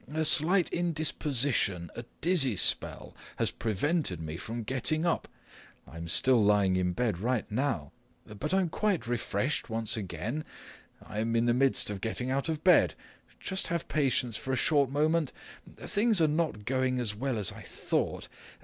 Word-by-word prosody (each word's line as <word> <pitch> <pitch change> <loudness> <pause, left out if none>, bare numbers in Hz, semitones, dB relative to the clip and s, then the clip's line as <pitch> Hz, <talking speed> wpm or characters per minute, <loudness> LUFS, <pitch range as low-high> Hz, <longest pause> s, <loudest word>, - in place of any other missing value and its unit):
A 160 +1 0
slight 170 +4 +3
indisposition, 145 - 0
a 120 - -6 0.2
dizzy 155 - +3
spell, - - 0 0.2
has - - 0
prevented 115 - -1
me 80 -1 -5
from 115 +6 -5
getting 135 +7 -1
up. 170 - 0 0.6
I'm 85 +1 -8
still 120 +6 +4
lying 100 -2 +3
in 90 -1 0
bed 110 -5 -1
right 120 +2 0
now. 115 - -1 0.3
But 105 +10 -5
I'm 190 -2 +2
quite 200 -3 0
refreshed 120 +2 -1
once 115 -1 -1
again. 105 - -4 0.6
I'm 110 +2 -2
in 115 +1 +3
the 120 - +3
midst 130 -3 +2
of 100 -2 -5
getting 125 +4 -2
out 135 +3 -1
of 155 -1 -3
bed. 180 0 +5 0.4
Just 190 0 -2
have 170 0 -2
patience 130 -6 0
for 130 - -4
a - - +2
short 140 0 +2
moment! 155 +1 +1 0.5
Things 215 -1 +1
are 160 - +4
not 150 -9 -1
going 130 0 0
as 120 -4 -1
well 125 +3 -2
as 105 -3 -1
I - - -11
thought. - - -2
130 Hz, 160 wpm, -30 LUFS, 105-155 Hz, 0.6 s, bed